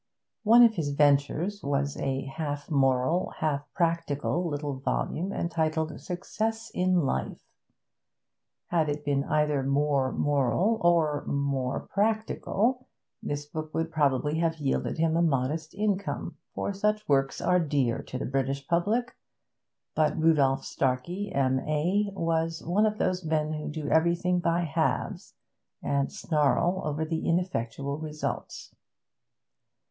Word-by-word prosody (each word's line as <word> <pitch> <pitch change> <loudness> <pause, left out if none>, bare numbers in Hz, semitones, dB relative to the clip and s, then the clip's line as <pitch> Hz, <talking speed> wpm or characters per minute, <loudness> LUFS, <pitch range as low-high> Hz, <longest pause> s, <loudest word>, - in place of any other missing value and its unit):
One 230 +2 +7
of 230 -2 +6
his 160 -8 -2
ventures 145 +7 +2
was 140 0 -1
a 135 0 -2
half 145 +2 -5
moral, 135 +4 +2
half 145 -2 -2
practical 170 0 0
little 145 -2 -3
volume 175 +6 -2
entitled 160 -3 -1
Success 220 +5 -3
in 180 -1 +2
Life. 65 - -2 1.3
Had 160 -3 +2
it 145 0 -3
been 140 -1 +1
either 150 -2 +1
more 140 -1 +1
moral 145 - +1
or 160 -4 +3
more 140 -2 -1
practical, 220 +3 0 0.3
this 145 0 -3
book 155 +1 -6
would 165 0 -1
probably 150 0 +1
have 165 -1 +1
yielded 140 +1 -1
him 160 0 +2
a 170 - +3
modest 155 +1 0
income, 200 -7 -2 0.2
for 200 - -2
such 210 +2 0
works 135 -1 +2
are 180 0 +3
dear 140 -7 0
to 130 - -6
the 130 - -3
British 135 +1 -2
public; 210 +9 0 0.8
but 155 -1 +1
Rudolph 145 -4 +3
Starkey, 170 +10 -1
M.A., 150 +9 +1
was 165 -1 -1
one 205 +6 +3
of 215 0 -2
those 185 -2 0
men 155 -1 0
who 150 -1 -4
do 155 -1 -5
everything 170 +2 +2
by 170 0 +1
halves 155 -5 -2 0.5
and 140 -1 0
snarl 165 +4 +1
over 150 +1 -1
the 160 0 -2
ineffectual 140 -5 -1
results. 155 -1 -5
155 Hz, 130 wpm, -28 LUFS, 140-175 Hz, 1.3 s, One